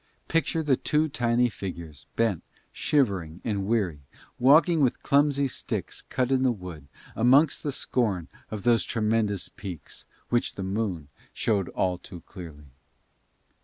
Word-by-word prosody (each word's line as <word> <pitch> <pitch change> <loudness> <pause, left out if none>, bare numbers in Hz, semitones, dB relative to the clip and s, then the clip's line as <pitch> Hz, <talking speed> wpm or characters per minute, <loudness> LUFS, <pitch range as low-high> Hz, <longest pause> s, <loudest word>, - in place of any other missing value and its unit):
Picture 165 0 +1
the 140 -4 +3
two 155 +1 +1
tiny 120 -2 +2
figures, 85 - -7
bent, 110 -7 +1 0.3
shivering 95 - 0
and 100 -3 -1
weary, 95 -10 0 0.4
walking 155 +6 +5
with 130 -4 +1
clumsy 140 -1 +3
sticks - - -5
cut 130 0 0
in 130 -1 +3
the 130 -1 +3
wood, 90 -9 -8 0.3
amongst 135 +7 +4
the 145 - -2
scorn 105 -10 -1 0.2
of 105 -2 -5
those 120 -1 +4
tremendous 110 -3 0
peaks, 90 -6 -9 0.2
which 120 -1 +1
the 95 - -4
moon 95 -6 -2 0.3
showed 100 -5 0
all 90 -1 -1
too 90 -3 -11
clearly. 80 -6 -11
110 Hz, 135 wpm, -27 LUFS, 90-130 Hz, 0.4 s, walking